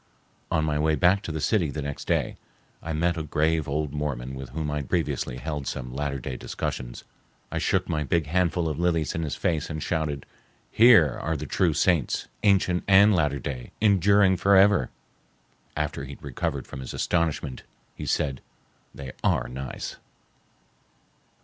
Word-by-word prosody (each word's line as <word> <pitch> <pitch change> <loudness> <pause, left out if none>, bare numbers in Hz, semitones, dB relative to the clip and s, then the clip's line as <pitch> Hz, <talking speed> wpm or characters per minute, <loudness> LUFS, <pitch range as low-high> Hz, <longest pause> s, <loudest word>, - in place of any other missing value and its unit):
On 80 - +1
my 75 -1 0
way 80 +1 +2
back 90 +4 +3
to 85 - -5
the 80 - -3
city, 85 +1 +1
the 75 +1 -4
next 70 0 -5
day, - - 0 0.5
I 80 - -5
met 85 +2 0
a - - -2
grave 80 +1 0
old 75 0 -2
Mormon 70 -4 -3
with 65 -1 -7
whom 75 -1 -3
I 75 - -1
had 70 -3 -5
previously 65 -1 -1
held 75 0 -4
some 60 -2 -5
Latter 70 0 -2
Day 65 0 -5
discussions. - - -5 0.5
I - - -1
shook - - +1
my 75 -1 -1
big 80 +2 0
handful 85 +1 +1
of 75 -1 -3
lilies 85 -3 +1
in 80 - -2
his 75 -3 -2
face 80 -4 -1
and 80 -1 -4
shouted, 75 -4 -2 0.5
"Here 110 - +6
are 80 +1 -1
the 75 - -5
true 85 -2 +1
saints, 80 -3 +1
ancient 95 -3 +3
and 100 +2 +7
Latter 75 -4 +1
Day, 65 -2 -6
enduring 100 -2 +4
forever!" 100 -6 +5 0.9
After 75 -2 -2
he 70 +1 -7
had - - -15
recovered 70 -4 -3
from - - -9
his 65 - -6
astonishment 80 -6 -1 0.3
he - - -7
said, 70 -4 0 0.5
"They 70 -2 -7
are - - +2
nice." 65 +1 -6
75 Hz, 170 wpm, -26 LUFS, 70-85 Hz, 0.9 s, and